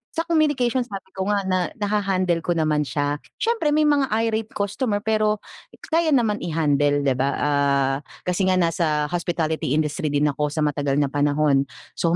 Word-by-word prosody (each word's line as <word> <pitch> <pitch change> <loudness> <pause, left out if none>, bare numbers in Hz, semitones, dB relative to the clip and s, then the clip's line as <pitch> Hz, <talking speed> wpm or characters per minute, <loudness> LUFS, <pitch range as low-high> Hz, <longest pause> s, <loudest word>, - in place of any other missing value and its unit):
Sa 325 - 0
communication 290 -7 +1
sabi 195 -2 -8
ko 190 0 -4
nga 205 -1 +1
na 185 -1 0 0.2
naha-handle 195 -5 0
ko 170 +1 -1
naman 150 -3 +1
siya. 145 0 -1 0.2
Siyempre 450 -11 0
may 310 - +3
mga 290 -2 +3 0.2
irate 225 -1 -1
customer, 205 +1 -1
pero 215 -1 +1 0.5
kaya 330 +1 +2
naman 225 -5 +1
i-handle, 145 -3 +1
'di 140 - +2
ba, 135 +1 +2
ah, 140 -2 +1 0.3
kasi 180 +1 0
nga 185 - +3
nasa 165 -4 +1
hospitality 160 -5 -1
industry 155 +2 -1
din 145 0 +1
ako 150 +2 -1
sa 155 +1 -2
matagal 145 -2 0
na 145 -1 +1
panahon. 145 -1 +2 0.3
So, 170 0 +2
170 Hz, 170 wpm, -23 LUFS, 145-210 Hz, 0.5 s, may